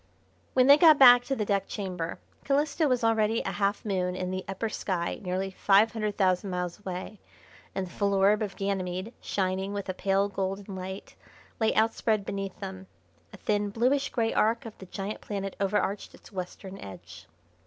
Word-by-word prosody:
When 255 -1 +6
they 285 +2 +8
got 315 -3 +8
back 245 -2 +9
to 270 - -1
the 215 - -1
deck 200 -1 0
chamber 180 -5 -4 0.3
Calisto 290 +3 +1
was 250 -3 +1
already 225 0 +2
a - - -2
half 200 +1 -1
moon 180 -3 -1
in 185 0 -3
the 185 0 -3
upper 195 +4 -2
sky 185 -5 -2
nearly 190 +1 -2
five 200 +3 +4
hundred 215 -2 -2
thousand 185 0 +2
miles 180 0 -3
away, 190 +1 -6 0.6
and 190 - -1
the 175 - -12
full 200 +1 0
orb 200 +3 +4
of 205 -2 -3
Ganymede, 190 +1 -3
shining 190 0 -1
with 200 -1 -4
a - - 0
pale 195 +1 +1
golden 195 0 -4
light, 190 +1 -7 0.5
lay 220 -1 +3
outspread 220 -1 +1
beneath 195 -1 -4
them. 190 -1 -7 0.4
A - - -11
thin, 205 -1 0
bluish 255 +7 +1
grey 225 -2 0
arc 230 +2 +2
of 225 - -8
the 190 - -10
giant 195 +3 -5
planet 195 -2 -4
overarched 200 0 -1
its - - -17
western 190 +1 -7
edge. 85 -3 -11
200 Hz, 180 wpm, -28 LUFS, 185-220 Hz, 0.6 s, back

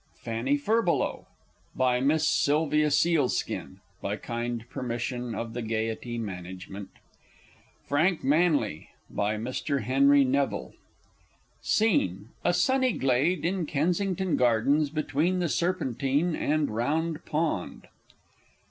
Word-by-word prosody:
Fanny 120 +5 0
Furbelow. 215 +4 0 0.5
By 125 -1 +2
Miss 155 +4 +2
SYLVIA 150 0 +2
SEALSKIN 150 -2 0 0.2
(by - - -2
kind 120 0 -4
permission 120 -1 -4
of 115 -1 -4
the 120 - -3
Gaiety 115 +1 -3
Management). 95 -1 -7 1.0
Frank 160 +5 +1
Manly. 145 - +1 0.2
By 105 +1 0
Mr. 130 +4 -2
HENRY 140 +4 +5
NEVILLE. 135 +1 -1 0.9
SCENE 105 - +1
_A 175 - +2
sunny 260 +6 +2
Glade 140 +6 +1
in 180 -2 -1
Kensington 180 +4 0
Gardens, 125 +5 +3
between 155 +4 0
the 175 -1 0
Serpentine 145 +1 0
and 150 -2 0
Round 155 +8 -1
Pond. 155 - -2
140 Hz, 105 wpm, -27 LUFS, 120-165 Hz, 1.0 s, HENRY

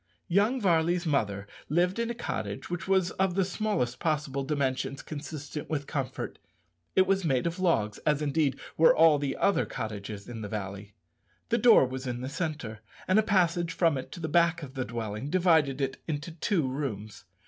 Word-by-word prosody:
Young 205 +8 +3
Varley's 175 -3 +2
mother 100 -10 0 0.2
lived 180 +6 +2
in 235 0 0
a 235 - -3
cottage 110 - -4
which 175 +1 -4
was 190 -2 +2
of 190 -2 +2
the 190 -1 +2
smallest 180 - -1
possible 150 -4 -1
dimensions 135 -1 -1
consistent 150 -1 -6
with 145 -3 -2
comfort. 135 -4 -4 0.6
It 190 - +5
was 195 0 +1
made 135 -4 +1
of 170 +2 -2
logs, 110 - +1
as, 150 -2 +1
indeed, 145 -2 0 0.2
were 160 - +6
all 160 -2 +6
the 140 -1 -2
other 195 -5 +2
cottages 105 -1 -6
in 120 -2 -7
the 105 - -5
valley. 100 0 -6 0.5
The 235 - +2
door 225 - +7
was 130 +1 -5
in 120 0 -3
the 130 - -4
centre, 140 -8 -4 0.3
and 185 +3 +5
a - - +6
passage 175 -5 +1
from 165 -4 +3
it 130 - -5
to - - -8
the 160 - -3
back 170 +1 +3
of 130 -2 -8
the 130 -2 -2
dwelling 110 +3 -4
divided 160 -6 +3
it 135 -1 -2
into 155 +2 -3
two 165 - 0
rooms. 115 -7 -5
150 Hz, 185 wpm, -28 LUFS, 130-175 Hz, 0.6 s, door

